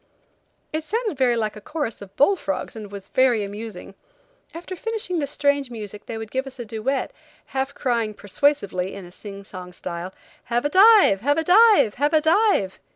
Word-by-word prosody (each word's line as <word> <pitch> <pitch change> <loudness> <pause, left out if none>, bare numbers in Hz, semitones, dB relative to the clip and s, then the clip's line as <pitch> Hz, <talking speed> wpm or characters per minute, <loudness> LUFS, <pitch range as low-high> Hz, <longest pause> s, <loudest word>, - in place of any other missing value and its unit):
It 310 0 -2
sounded 430 +2 -2
very 250 -3 +2
like 215 -2 -1
a 210 - -10
chorus 290 -5 -4
of 195 -1 -12
bull 340 +9 +4
frogs 195 - -4
and 210 -2 -8
was 200 -1 -9
very 250 -5 +3
amusing. 205 -1 -7 0.6
After 350 +3 -7
finishing 415 -3 -3
this 285 -2 -2
strange 285 -2 +1
music 210 -3 -8
they 225 - -5
would 220 -1 -7
give 265 +1 -2
us 265 0 -10
a 240 - -6
duet, 225 +5 -2 0.4
half 270 +1 -2
crying, 230 -4 -1
persuasively, 200 -5 0
in 195 -2 -8
a 175 - -13
sing 200 +1 -9
song 185 -2 -9
style: 175 +1 -6 0.3
"Have 240 +3 -1
a - - +2
dive! 390 - +6
Have 290 +5 +2
a 320 - +1
dive! 365 - +6
Have 295 +2 +3
a 310 - +5
dive!" 320 - +2
245 Hz, 190 wpm, -23 LUFS, 205-305 Hz, 0.6 s, dive